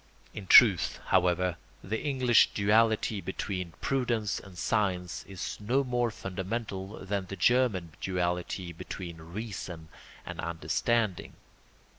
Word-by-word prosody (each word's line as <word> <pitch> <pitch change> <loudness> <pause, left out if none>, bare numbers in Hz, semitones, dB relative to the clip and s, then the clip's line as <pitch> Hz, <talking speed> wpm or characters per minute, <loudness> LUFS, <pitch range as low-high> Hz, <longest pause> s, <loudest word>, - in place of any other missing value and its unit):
In 100 -3 -8
truth, 100 -7 +7
however, 90 -1 +2 0.3
the 110 +3 -3
English 130 -5 +4
duality 110 0 +2
between 90 -3 -4
prudence 120 -6 0
and 95 -2 -13
science 90 -4 -1
is 95 -2 -6
no 125 +7 +1
more 120 -2 0
fundamental 95 0 -5
than 100 -1 -2
the 100 - -6
German 105 -5 +2
duality 90 -1 -2
between 85 +1 -7
reason 90 -2 -7 0.4
and - - -7
understanding. 85 +5 -1
95 Hz, 110 wpm, -29 LUFS, 90-115 Hz, 0.4 s, truth